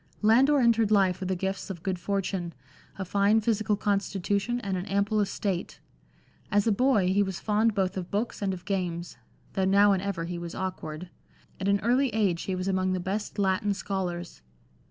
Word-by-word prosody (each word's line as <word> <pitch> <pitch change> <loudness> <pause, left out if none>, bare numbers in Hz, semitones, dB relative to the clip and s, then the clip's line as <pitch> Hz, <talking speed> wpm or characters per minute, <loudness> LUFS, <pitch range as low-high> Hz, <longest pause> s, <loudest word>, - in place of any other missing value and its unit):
Landor 260 +7 +5
entered 230 -3 +3
life 190 -4 +3
with 190 -1 -4
the 190 - +1
gifts 190 +3 -3
of 180 -3 -7
good 185 -2 -2
fortune, 185 -2 -2 0.4
a 190 - -4
fine 200 +4 +3
physical 220 -1 +1
constitution 200 +2 -1
and 195 -3 -2
an 185 +2 -4
ample 200 +2 +1
estate. 195 -2 -2 0.7
As 205 0 +2
a 225 - +3
boy, 215 -4 +3
he 200 - +3
was 190 -3 -2
fond 215 +1 +1
both 190 -2 0
of 180 -2 -4
books 215 +3 -2
and 200 -1 0
of 180 -1 -7
games 175 -3 -3 0.4
(though 190 - +1
now 200 +2 +5
and 190 -2 +1
ever 195 -4 -3
he 175 0 -4
was 170 -1 -6
awkward); 180 -2 -5 0.5
at 190 - -2
an 200 0 +3
early 250 +5 +2
age 195 -6 +1
he 190 - -2
was 185 +1 -3
among 185 -1 +1
the 185 - -1
best 195 +5 -3
Latin 200 +1 +1
scholars. 180 - -4
195 Hz, 190 wpm, -27 LUFS, 185-210 Hz, 0.7 s, Landor